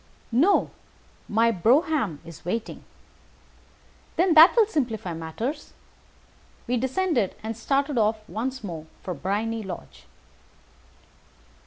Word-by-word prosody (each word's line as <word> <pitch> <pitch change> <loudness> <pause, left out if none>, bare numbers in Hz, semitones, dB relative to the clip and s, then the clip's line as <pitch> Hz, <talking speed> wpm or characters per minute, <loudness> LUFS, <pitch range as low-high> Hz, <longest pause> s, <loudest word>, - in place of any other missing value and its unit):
"No, 315 - +3 0.6
my 230 +2 +3
brougham 235 - +2
is 165 -2 -12
waiting." 220 +6 -4 1.3
"Then 355 0 +3
that 320 +3 +9
will 455 -3 +6
simplify 235 - -2
matters." 220 - -5 0.9
We 250 - 0
descended, 265 - 0
and 225 +1 -4
started 275 +3 0
off 215 0 0
once 255 +3 -4
more 165 -5 -6 0.2
for 180 - -3
Briony 215 +6 -2
Lodge. 190 -4 -9
230 Hz, 105 wpm, -25 LUFS, 200-285 Hz, 1.3 s, that